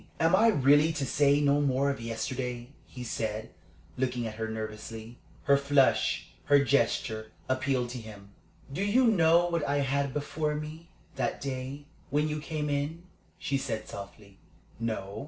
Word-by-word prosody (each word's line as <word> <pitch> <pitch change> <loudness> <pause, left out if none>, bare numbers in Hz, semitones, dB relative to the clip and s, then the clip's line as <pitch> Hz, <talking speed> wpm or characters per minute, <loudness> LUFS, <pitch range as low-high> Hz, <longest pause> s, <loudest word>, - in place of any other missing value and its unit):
"Am 165 +3 +4
I 225 +4 +5
really 145 - +5
to 145 -3 -2
say 145 +2 +3
no 145 0 +3
more 140 0 +2
of 135 - -6
yesterday?" 120 +1 -4 0.2
he 125 - -8
said, 110 -2 -3 0.5
looking 125 -2 -1
at 110 - -4
her 110 +1 -3
nervously. 110 +1 -6 0.2
Her 140 - +5
flush, 140 -1 +2
her 145 0 +6
gesture, 110 -5 +1 0.2
appealed 130 -1 0
to 125 0 -5
him. 105 -3 -11 0.4
"Do 190 - -1
you 235 +6 +4
know 170 -6 +5
what 170 -3 -1
I 145 0 0
had 140 0 0
before 150 +2 -2
me 155 +2 -7 0.3
that 125 -3 -1
day 135 +1 -5 0.2
when 150 +2 +1
you 150 0 -2
came 150 0 -3
in?" 145 +4 -2 0.3
she 135 0 -1
said, 110 -4 -4
softly. 100 0 -10 0.4
"No. 110 -3 -3
135 Hz, 155 wpm, -29 LUFS, 115-150 Hz, 0.5 s, her